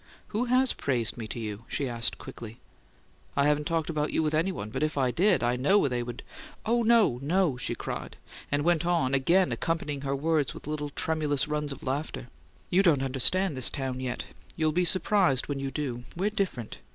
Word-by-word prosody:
"Who 225 Hz, +4 st, -1 dB
HAS 255 Hz, +1 st, +3 dB
praised 120 Hz, -5 st, -1 dB
me 115 Hz, -2 st, -6 dB
to 120 Hz, -, -6 dB
you?" 105 Hz, -1 st, -5 dB
she 140 Hz, -, -1 dB
asked, 120 Hz, -1 st, -1 dB
quickly. 115 Hz, 0 st, -9 dB, 0.8 s
"I 140 Hz, -, +3 dB
haven't 150 Hz, 0 st, +2 dB
talked 165 Hz, -2 st, 0 dB
about 150 Hz, -2 st, -1 dB
you 160 Hz, -, +1 dB
with 155 Hz, 0 st, 0 dB
any 165 Hz, +5 st, +2 dB
one; 105 Hz, -, -6 dB
but -, -, -3 dB
if 155 Hz, -1 st, 0 dB
I 130 Hz, -2 st, +2 dB
did, 185 Hz, +3 st, +3 dB
I 120 Hz, +1 st, +2 dB
know 145 Hz, +7 st, +4 dB
they'd 120 Hz, -2 st, -3 dB, 0.2 s
" -, -, -15 dB
"No, 230 Hz, -, +4 dB
no!" 165 Hz, 0 st, +2 dB
she 125 Hz, -, -2 dB
cried, -, -, -6 dB, 0.3 s
and 145 Hz, 0 st, +1 dB
went 170 Hz, 0 st, +2 dB
on, 170 Hz, -7 st, +1 dB
again 170 Hz, +8 st, +3 dB
accompanying 150 Hz, -4 st, -2 dB
her 140 Hz, 0 st, -1 dB
words 150 Hz, 0 st, 0 dB
with -, -, -10 dB
little 150 Hz, 0 st, -3 dB
tremulous 150 Hz, -2 st, 0 dB
runs 150 Hz, -1 st, -2 dB
of 140 Hz, -, -8 dB
laughter. 130 Hz, -2 st, -3 dB, 0.4 s
"You 185 Hz, -, +5 dB
don't 155 Hz, -8 st, +3 dB
understand 140 Hz, +7 st, +1 dB
this 130 Hz, -2 st, +3 dB
town 130 Hz, -2 st, -3 dB
yet. 125 Hz, -1 st, -3 dB, 0.3 s
You'll 155 Hz, -1 st, +2 dB
be 180 Hz, +3 st, +1 dB
surprised 185 Hz, -7 st, +3 dB
when 145 Hz, -1 st, -3 dB
you 135 Hz, 0 st, -2 dB
do; 130 Hz, -4 st, -4 dB
we're 200 Hz, +4 st, +1 dB
different. 190 Hz, -, -3 dB
150 Hz, 200 wpm, -28 LUFS, 130-175 Hz, 0.8 s, You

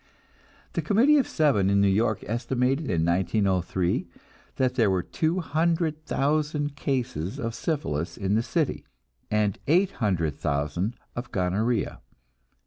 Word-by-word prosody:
The -, -, 0 dB
Committee 250 Hz, +9 st, +4 dB
of 270 Hz, -, +1 dB
Seven 135 Hz, -, +2 dB
in 100 Hz, 0 st, +3 dB
New 100 Hz, -, +4 dB
York 110 Hz, +3 st, +1 dB
estimated 125 Hz, +5 st, 0 dB
in 80 Hz, -3 st, +1 dB
1903 90 Hz, 0 st, +1 dB, 0.5 s
that 130 Hz, -1 st, +1 dB
there 115 Hz, -5 st, +3 dB
were 95 Hz, -2 st, +1 dB
two 165 Hz, +3 st, -1 dB
hundred 160 Hz, 0 st, 0 dB
thousand 145 Hz, 0 st, 0 dB
cases 120 Hz, -, -2 dB
of 115 Hz, -1 st, -3 dB
syphilis 90 Hz, -, -2 dB
in 100 Hz, -1 st, -1 dB
the 110 Hz, -, +3 dB
city, 155 Hz, +4 st, -1 dB, 0.5 s
and 105 Hz, -2 st, +1 dB
eight 180 Hz, +6 st, +4 dB
hundred 90 Hz, -, 0 dB
thousand 75 Hz, -, -2 dB, 0.2 s
of 120 Hz, +1 st, -5 dB
gonorrhea. 100 Hz, +6 st, 0 dB
115 Hz, 135 wpm, -26 LUFS, 95-150 Hz, 0.5 s, Committee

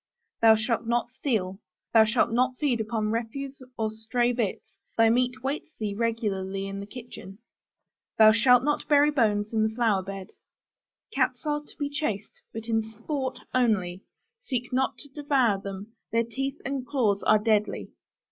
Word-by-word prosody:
Thou 225 Hz, -1 st, +8 dB
shalt 225 Hz, +1 st, -1 dB
not 240 Hz, +1 st, 0 dB
steal. 215 Hz, -8 st, -2 dB, 0.3 s
Thou 220 Hz, -1 st, +7 dB
shalt 220 Hz, +2 st, +2 dB
not 250 Hz, +2 st, +1 dB
feed 255 Hz, -7 st, +1 dB
upon 215 Hz, -1 st, -1 dB
refuse 265 Hz, +5 st, -4 dB, 0.2 s
or 220 Hz, -1 st, -1 dB
stray 230 Hz, +3 st, 0 dB
bits: 230 Hz, -5 st, -3 dB, 0.2 s
thy 225 Hz, 0 st, +5 dB
meat 250 Hz, +1 st, 0 dB
waits 290 Hz, +3 st, -4 dB
thee 210 Hz, -2 st, -2 dB
regularly 200 Hz, -4 st, -2 dB
in 195 Hz, 0 st, -5 dB
the 200 Hz, -, -7 dB
kitchen. 210 Hz, -5 st, -10 dB, 0.8 s
Thou 215 Hz, -1 st, +8 dB
shalt 245 Hz, +3 st, +5 dB
not 295 Hz, +1 st, 0 dB
bury 295 Hz, 0 st, +5 dB
bones 215 Hz, -5 st, +1 dB
in 220 Hz, -, +2 dB
the 220 Hz, 0 st, 0 dB
flower 225 Hz, -5 st, +2 dB
beds. 195 Hz, 0 st, -8 dB, 0.8 s
Cats -, -, 0 dB
are 295 Hz, 0 st, 0 dB
to 295 Hz, -, -17 dB
be 290 Hz, -, -1 dB
chased, 285 Hz, -9 st, -3 dB
but 225 Hz, 0 st, -6 dB
in 225 Hz, -1 st, +2 dB
sport 255 Hz, +5 st, -4 dB
only; 195 Hz, -8 st, +1 dB, 0.4 s
seek 250 Hz, -1 st, -3 dB
not 260 Hz, +1 st, +1 dB
to 285 Hz, -, -10 dB
devour 265 Hz, -8 st, +1 dB
them: 200 Hz, +3 st, -7 dB, 0.2 s
their 230 Hz, +1 st, +2 dB
teeth 270 Hz, +4 st, -4 dB
and 275 Hz, -1 st, -2 dB
claws 220 Hz, -7 st, +1 dB
are 215 Hz, -, +5 dB
deadly. 210 Hz, -1 st, 0 dB
230 Hz, 165 wpm, -27 LUFS, 215-260 Hz, 0.8 s, Thou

